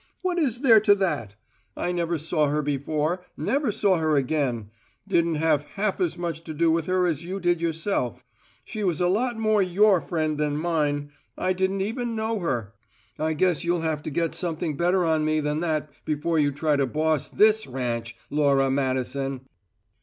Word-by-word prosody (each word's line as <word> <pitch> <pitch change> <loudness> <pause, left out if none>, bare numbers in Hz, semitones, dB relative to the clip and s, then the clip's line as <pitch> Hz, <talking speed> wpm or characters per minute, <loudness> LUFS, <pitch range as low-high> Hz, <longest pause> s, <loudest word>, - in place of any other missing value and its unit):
What 360 -1 0
is 255 -6 0
there 230 -6 +7
to 205 -1 +5
that? 150 - -2 0.4
I 175 - -1
never 170 -1 -1
saw 155 0 +1
her 150 +1 0
before; 150 +5 -1
never 275 -4 0
saw 195 -2 +2
her 155 -2 +1
again; 130 -6 -1 0.4
didn't 170 -4 +2
have 155 -2 +2
half 205 0 -1
as 175 -3 0
much 170 -2 -3
to 155 - -6
do 165 +1 +3
with 165 -1 0
her 185 0 +2
as 165 -2 -1
you 185 +3 -4
did 175 -2 +1
yourself. 165 - -2 0.4
She 215 - -5
was 175 -5 0
a 180 - +2
lot 235 +6 0
more 215 -2 +2
your 190 0 +4
friend 155 -3 -2
than 150 -1 0
mine; 150 -3 -1 0.3
I 185 0 +1
didn't 190 +1 0
even 230 +3 -2
know 220 0 -1
her. 120 - -2 0.5
I 160 +1 0
guess 175 +1 +1
you'll 175 0 0
have 160 -2 -1
to - - -5
get 165 +2 -1
something 160 -3 -2
better 175 +3 +2
on 160 -1 +2
me 155 0 +1
than 150 0 -1
that, 155 -3 -1
before 155 +2 0
you 145 -1 +3
try 145 +1 0
to 135 -1 +1
boss 155 +1 0
this 215 +1 +3
ranch, 120 -3 -3 0.2
Laura 140 -2 +3
Madison!" 135 0 -1
160 Hz, 185 wpm, -25 LUFS, 145-185 Hz, 0.5 s, there